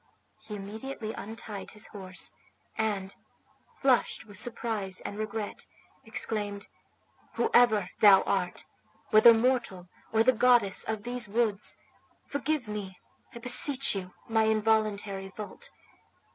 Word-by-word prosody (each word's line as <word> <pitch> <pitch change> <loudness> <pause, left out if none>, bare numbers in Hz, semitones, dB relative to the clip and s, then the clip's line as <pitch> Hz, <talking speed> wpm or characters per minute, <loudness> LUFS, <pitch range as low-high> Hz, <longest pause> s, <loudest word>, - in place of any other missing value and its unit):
He 210 - -5
immediately 220 +3 -6
untied 215 -1 -8
his 210 -1 -5
horse, 185 -3 -5 0.4
and, 205 -3 -2 0.6
flushed 260 -4 +1
with 205 -2 -13
surprise 220 -5 -2
and - - -6
regret, 215 -1 -5 0.4
exclaimed, 205 -2 -4 0.7
"Whoever 220 - +3
thou 200 -2 +7
art, - - -2 0.5
whether 215 +2 +9
mortal 225 -7 0 0.2
or 225 0 +4
the 255 +2 +5
goddess 235 -5 +3
of 220 -2 -3
these 245 -1 -3
woods, 215 -2 -1 0.5
forgive 285 -2 -2
me, 200 -3 -6 0.4
I - - -6
beseech 255 +3 +4
you, 185 -2 -6
my 225 -1 +2
involuntary 215 -3 0
fault. 220 - -8
220 Hz, 115 wpm, -29 LUFS, 200-235 Hz, 0.7 s, whether